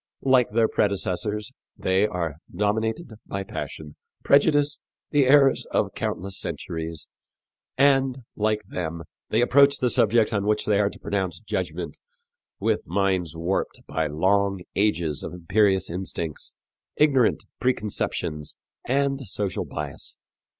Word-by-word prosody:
Like 130 -3 +4
their 110 +1 +3
predecessors, 105 +3 -1 0.3
they 95 +3 +2
are 85 -7 -3
dominated 110 +4 -1
by 100 0 -3
passion, 75 -5 -7 0.3
prejudice, 145 0 +4 0.3
the 145 -3 +4
errors 135 0 +5
of - - 0
countless 95 +2 -3
centuries, 80 -1 -4 0.7
and, 135 -2 +3
like 105 0 0
them, 85 -3 -4 0.3
they 110 - +2
approach 140 +3 +5
the 125 -2 +1
subject 115 +1 +3
on 100 -1 0
which 105 0 +1
they 105 -1 +3
are 100 -1 +3
to - - -12
pronounce 95 -4 -2
judgment, 110 - -4 0.6
with 110 +1 0
minds 95 -3 0
warped 85 +4 -2
by 80 -1 -1
long 95 +5 +1
ages 85 -8 +1
of - - -6
imperious 95 +2 +2
instincts, 85 -3 -4 0.4
ignorant 135 -6 +3 0.2
preconceptions 105 -10 -1 0.3
and 135 +1 +1
social 100 0 -2
bias. 75 -2 -6
105 Hz, 120 wpm, -25 LUFS, 90-125 Hz, 0.7 s, errors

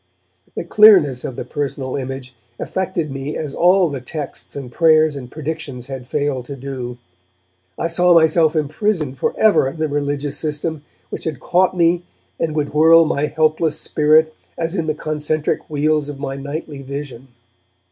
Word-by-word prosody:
The - - -3
clearness 180 - +5
of 130 - -5
the - - -5
personal 135 -1 -3
image 130 -1 -5 0.2
affected 175 -5 -3
me 135 +2 -4
as 150 -3 -4
all 180 +1 +4
the 140 -4 -5
texts 145 +3 -7
and 135 -3 -7
prayers 155 0 +4
and 125 -3 -8
predictions 150 -5 -5
had 130 -2 -7
failed 140 -3 -2
to 140 - -7
do. 130 -2 -6 0.8
I - - -1
saw 175 +1 +4
myself 160 0 +4
imprisoned 155 - -1
for - - -1
ever 215 -10 +4
in 135 - -6
the 155 0 0
religious 145 -1 -2
system 155 0 -3 0.3
which - - -6
had 155 -5 -3
caught 185 +1 +1
me 170 0 +3 0.4
and 160 -2 -1
would 145 -2 -1
whirl 165 +2 +6
my 150 -1 0
helpless 155 0 +1
spirit 155 +1 +3 0.2
as 165 0 -2
in 165 -5 -2
the 155 - 0
concentric 155 0 -2
wheels 150 0 0
of 145 - -6
my 135 -1 -4
nightly 145 +1 -6
vision. 140 -2 -7
150 Hz, 165 wpm, -19 LUFS, 140-160 Hz, 0.8 s, whirl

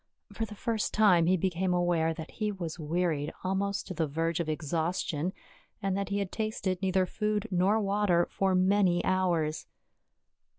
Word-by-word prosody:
For 225 - -2
the 210 -1 -10
first 220 0 -2
time 185 -6 +5
he 185 +1 +4
became 180 +1 0
aware 175 -2 +2
that 160 0 -7
he 215 -1 -2
was 175 -4 -6
wearied 155 -2 -1
almost 195 +2 -1
to 185 - -6
the 165 -3 0
verge 165 +3 -1
of 165 -2 -2
exhaustion, 160 +1 -1 0.5
and 195 -1 -1
that 200 -1 -2
he 200 - -1
had 200 -2 -2
tasted 215 -4 -2
neither 190 -1 +2
food 210 +2 -1
nor 190 +4 +3
water 200 -4 +2
for 190 -1 +1
many 185 -1 +3
hours. 175 -5 0
185 Hz, 165 wpm, -29 LUFS, 170-200 Hz, 0.5 s, time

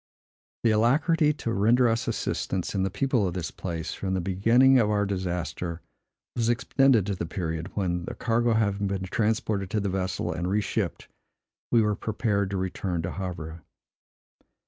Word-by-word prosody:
The 115 - +4
alacrity 150 +8 +3
to 115 -6 -3
render 115 +5 +4
us 115 0 0
assistance, 95 -2 -2
in 100 - 0
the 95 - +1
people 115 +1 +1
of 90 - -4
this 90 -3 -3
place, 85 -3 -4
from 95 -1 -2
the - - 0
beginning 115 +9 +4
of 105 -3 +2
our 105 -1 +2
disaster, 90 -3 -3 0.5
was 115 -1 +1
extended 125 -2 +3
to 100 - -1
the 85 -2 -4
period, 80 0 -3
when, 90 -3 -1
the - - -6
cargo 120 0 +1
having 100 -2 +1
been 95 -1 -2
transported 105 -1 -1
to 105 - 0
the 100 -1 -1
vessel 95 -2 -2
and 85 +3 -2
re 100 +2 +2
shipped, 100 -3 -3 0.6
we 115 -2 +4
were 105 -1 +1
prepared 105 -3 -1
to 100 - -2
return 95 -2 -2
to 85 - -3
Havre. 85 -4 -6
100 Hz, 170 wpm, -26 LUFS, 90-115 Hz, 0.6 s, The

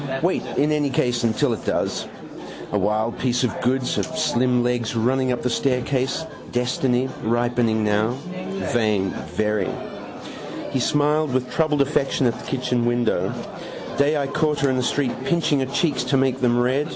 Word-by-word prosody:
Wait 180 +2 +1
in 150 +2 +3
any 150 -2 +1
case 125 -2 +1 0.2
till 145 -5 +2
it - - -6
does. - - -1 0.6
A 105 - +1
wild 110 +4 0
piece 125 0 +1
of 125 - -1
goods. 130 +1 +1
Her - - +1
slim 125 0 +1
legs 120 -2 -1
running 130 +3 +2
up 125 - -1
the 125 - +1
staircase. 130 +4 0 0.3
Destiny. 125 +1 +1
Ripening 120 -1 +1
now. 105 +2 +2 0.6
Vain: 105 -5 +2 0.3
very. 105 -3 +1 1.0
He 135 - 0
smiled 150 +2 +2
with 125 -1 -1
troubled 155 -3 +2
affection 135 -1 0
at 120 - +3
the - - -10
kitchen 125 -2 0
window. 120 -1 +1 0.7
Day 145 +2 +3
I 140 - 0
caught 150 +1 0
her 140 - +3
in 130 - 0
the - - +1
street 130 +1 0
pinching 160 -3 +2
her 135 - +1
cheeks 145 +2 0
to 135 - +2
make 130 -1 +1
them 120 -1 +3
red. 130 +5 +1
125 Hz, 165 wpm, -23 LUFS, 120-140 Hz, 1.0 s, in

